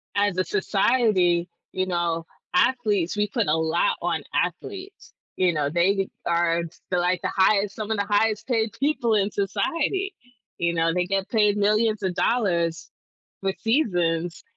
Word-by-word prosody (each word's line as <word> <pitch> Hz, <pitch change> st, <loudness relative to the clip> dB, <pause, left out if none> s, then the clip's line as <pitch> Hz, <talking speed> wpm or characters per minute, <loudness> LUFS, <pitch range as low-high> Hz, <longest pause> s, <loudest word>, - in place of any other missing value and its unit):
as 205 Hz, -2 st, +1 dB
a 185 Hz, -, +2 dB
society, 195 Hz, -4 st, +2 dB, 0.2 s
you 185 Hz, 0 st, -2 dB
know, 170 Hz, -2 st, -1 dB, 0.3 s
athletes 210 Hz, -4 st, +1 dB
we 210 Hz, 0 st, +1 dB
put -, -, -1 dB
a 150 Hz, -, +3 dB
lot 160 Hz, -, +1 dB
on -, -, -1 dB
athletes, 390 Hz, 0 st, -4 dB, 0.2 s
you 185 Hz, -1 st, +3 dB
know, 150 Hz, -2 st, 0 dB
they 190 Hz, +4 st, +2 dB, 0.2 s
are, 170 Hz, 0 st, +2 dB
s 170 Hz, 0 st, -7 dB
like, 180 Hz, 0 st, +1 dB
the -, -, 0 dB
highest 200 Hz, +1 st, +3 dB
some 215 Hz, -1 st, -5 dB
of 220 Hz, -, 0 dB
the 200 Hz, -, 0 dB
highest 215 Hz, 0 st, +1 dB
paid 225 Hz, -3 st, +1 dB
people 260 Hz, -6 st, +1 dB
in 205 Hz, 0 st, +1 dB
society, 335 Hz, -, -1 dB, 0.5 s
you 170 Hz, 0 st, +1 dB
know, 165 Hz, 0 st, +1 dB
they 180 Hz, 0 st, 0 dB
get 195 Hz, +1 st, -1 dB
paid 210 Hz, -2 st, +2 dB
millions 215 Hz, +1 st, +2 dB
of 185 Hz, -1 st, 0 dB
dollars 170 Hz, -8 st, 0 dB, 0.5 s
for 195 Hz, 0 st, 0 dB
seasons, 175 Hz, -, 0 dB
195 Hz, 155 wpm, -24 LUFS, 175-220 Hz, 0.5 s, a